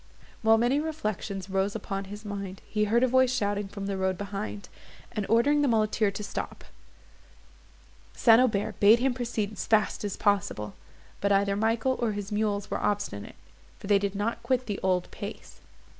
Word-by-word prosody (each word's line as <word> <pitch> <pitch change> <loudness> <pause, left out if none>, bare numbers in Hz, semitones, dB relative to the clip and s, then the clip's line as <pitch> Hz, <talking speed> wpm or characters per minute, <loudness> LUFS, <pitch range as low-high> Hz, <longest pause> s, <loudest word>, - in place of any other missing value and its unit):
While 225 0 +5
many 245 +5 +2
reflections 215 - -3
rose 195 +1 0
upon 195 -2 -4
his 205 +2 -9
mind, 200 -2 -6
he 210 -1 0
heard 235 +4 +3
a - - +5
voice 260 0 +4
shouting 205 -4 -1
from 195 0 -7
the 195 -1 -2
road 190 -1 0
behind, 205 +1 -5 0.4
and 210 -4 -3
ordering 285 +7 +4
the 290 - +3
muleteer 215 -2 +2
to 200 +2 -6
stop. 200 - -5 1.5
St. 230 0 +6
Aubert 215 -6 0
bade 210 +3 +7
him 255 +1 +1
proceed 230 -4 -2
as 205 - -5
fast 215 -1 +2
as 205 -2 -3
possible; 195 - 0 0.5
but 200 - +1
either 200 0 +3
Michael, 225 +5 +1
or 225 -3 +1
his 205 0 -5
mules 205 -1 -1
were - - -1
obstinate, 200 - -2 0.4
for - - -11
they 200 0 +4
did 200 0 -2
not 210 +3 -2
quit 255 -1 0
the 205 -3 -3
old 185 -1 +1
pace. - - -8
205 Hz, 175 wpm, -28 LUFS, 200-230 Hz, 1.5 s, bade